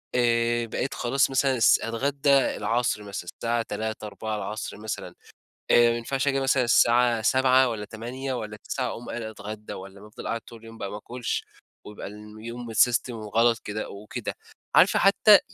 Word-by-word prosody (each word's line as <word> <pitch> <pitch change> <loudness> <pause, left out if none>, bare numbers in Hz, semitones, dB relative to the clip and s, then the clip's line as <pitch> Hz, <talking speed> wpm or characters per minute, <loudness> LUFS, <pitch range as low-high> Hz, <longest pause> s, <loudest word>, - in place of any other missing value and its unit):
آآ، 120 -1 +2
بقيت 125 +4 -3
خلاص 130 +3 +1
مثلًا 135 0 +2
الس 115 -2 +5
أتغدى 140 +5 -1
العصر 125 -5 +2
مثلًا، 100 -4 -6
الساعة 120 0 0
15:00، 110 0 -4
16:00 105 0 -5
مثلًا، 110 +1 -6 0.6
آآ، 120 0 +7
ما 115 - -1
ينفعش 135 +4 -2
آجي 135 -1 +2
مثلًا 135 -1 +2
الساعة 120 -1 +4
19:00 130 +2 +4
والَّا 110 -3 -4
20:00 125 +5 -5
والَّا 105 -3 -5
21:00 130 -2 -1
أقوم 120 - -6
قايل 120 - -4
أتغدى، 105 -1 -7
والَّا 100 +2 -10
أفضل 105 - -9
قاعد 115 0 -2
طول 115 -1 -14
يوم 115 0 -11
بقى 100 - -5
ما 105 - -5
آكُلش 120 +3 -4 0.4
ويبقى 105 -1 -8 0.3
يوم 115 +1 -7
الsystem 120 +3 +3
وغلط 115 +1 +1
كده 105 +1 -4
أو 100 +2 -10
كده، - - -4 0.4
عارفة - - +6
حتى - - +7
115 Hz, 165 wpm, -26 LUFS, 110-125 Hz, 0.6 s, آآ